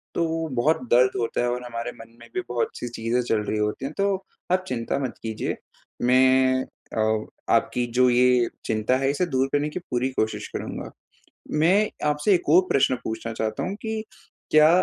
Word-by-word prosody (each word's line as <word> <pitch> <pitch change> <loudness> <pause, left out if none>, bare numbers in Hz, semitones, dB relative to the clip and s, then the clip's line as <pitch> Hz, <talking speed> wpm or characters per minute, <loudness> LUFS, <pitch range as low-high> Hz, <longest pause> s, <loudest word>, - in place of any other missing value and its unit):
तो 165 -1 0
बहुत 150 +6 +2
दर्द 125 +2 +5
होता 115 0 -1
है 120 - +1
और 125 0 -3
हमारे 115 0 -4
मन 115 0 -14
में 115 - -13
भी 185 - -1
बहुत-सी 120 0 -2
चीज़ें 120 +1 -1
चल 115 -2 0
रही 105 - -2
होती 105 +5 -1
है। 140 - -3
तो 200 -1 +2 0.4
आप 185 0 +2
चिंता 120 +2 -2
मत 130 -3 -3
कीजिए 110 -1 -3 0.5
मैं 130 +1 +4 0.3
अ, 110 0 +1 0.3
आपकी 125 -1 +2
जो 125 0 +6
ये 125 0 +4 0.2
चिंता 110 +3 +1
है 135 +1 +1
इसे 145 +6 +1
दूर 135 -5 +1
करने 145 +1 +1
की 180 - -5
पूरी 130 -5 -2
कोशिश 110 -3 -2
करूँगा। - - -5 0.7
मैं 195 +6 +4 0.2
आपसे 150 +7 +3
एक 175 - -1
और 175 +4 +8
प्रश्न 130 -1 +3
पूछना 115 +1 -4
चाहता 110 0 -2
हूँ 190 +2 -2
कि 220 -1 -2 0.5
क्या 155 0 +7
125 Hz, 180 wpm, -24 LUFS, 115-150 Hz, 0.7 s, और